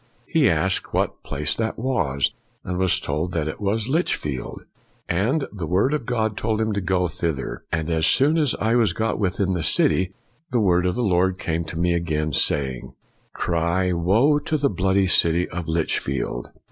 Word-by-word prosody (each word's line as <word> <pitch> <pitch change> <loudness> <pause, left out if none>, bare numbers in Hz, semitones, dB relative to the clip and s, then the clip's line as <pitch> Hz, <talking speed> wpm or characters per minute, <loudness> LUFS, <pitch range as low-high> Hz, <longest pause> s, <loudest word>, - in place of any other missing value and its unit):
r - - -36 0.2
He - - +3
asked - - 0
what - - -1
place 75 +1 -1
that 110 -1 -2
was, 85 - 0 0.3
and 90 -1 -3
was 95 -2 +3
told 80 +5 -3
that 80 -2 -1
it 80 - -6
was 105 +2 0
Lichfield. 75 - -2 0.4
And 115 - 0
the 90 -6 -5
Word 95 - +2
of 145 -6 -2
the 125 - -1
Lord 110 -2 0
told 110 0 -1
him 110 -1 0
to 100 - -1
go 90 0 +1
thither. 80 -4 -4
" - - -45
And 80 -1 -1
as 80 0 +2
soon 145 - +4
as 145 -5 +2
I 110 +2 0
was 115 -7 +3
got 110 +2 -1
within 95 -1 0
the 90 - -1
city, 95 +4 +2 0.4
the 125 - +1
Word 90 -3 +3
of 90 - -1
the 125 - -1
Lord 95 -2 +2
came 85 -2 -2
to 80 - -7
me 85 +1 +2
again, 80 -3 -1
saying, 65 -4 0 0.2
' - - -40
Cry, 85 +2 0
woe 110 - +3
to 155 +1 -1
the 140 -1 +1
bloody 95 +1 +2
city 85 -1 +3
of 85 -1 -5
Lichfield!' 70 -6 -2
90 Hz, 195 wpm, -23 LUFS, 80-110 Hz, 0.4 s, soon